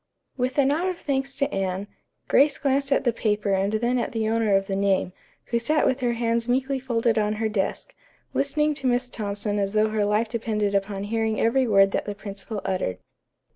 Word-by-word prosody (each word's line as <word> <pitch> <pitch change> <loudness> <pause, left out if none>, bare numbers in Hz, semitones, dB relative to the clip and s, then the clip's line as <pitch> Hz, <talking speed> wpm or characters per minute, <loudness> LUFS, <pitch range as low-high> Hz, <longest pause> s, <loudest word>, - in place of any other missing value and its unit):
With 255 +1 -2
a 280 - +5
nod 305 +7 +1
of 365 -2 -2
thanks 275 -2 -2
to 275 - -1
Anne, 190 0 -2 0.4
Grace 280 0 +4
glanced 275 0 0
at 275 - +3
the 240 -3 +2
paper 210 -2 0
and 195 +2 +1
then 240 +3 +1
at 240 - -3
the 220 -1 -1
owner 225 -3 +2
of 195 0 +2
the 195 - -2
name, 195 -2 +1 0.4
who 235 - +2
sat 300 +7 +1
with 260 - +1
her 245 -2 0
hands 230 0 0
meekly 265 +2 +1
folded 235 -3 +1
on 210 0 +1
her 220 +1 -1
desk, 210 - -2 0.4
listening 300 +2 +1
to 275 -3 -3
Miss 250 0 +1
Thompson 205 -1 -2
as 200 0 -1
though 215 0 +3
her 215 -1 0
life 210 +3 +1
depended 215 -3 -1
upon 195 0 -1
hearing 220 +1 -1
every 250 +3 +2
word 195 -2 +5
that - - -1
the 205 - -4
principal 200 +1 -6
uttered. 185 - -1
225 Hz, 210 wpm, -25 LUFS, 205-255 Hz, 0.4 s, a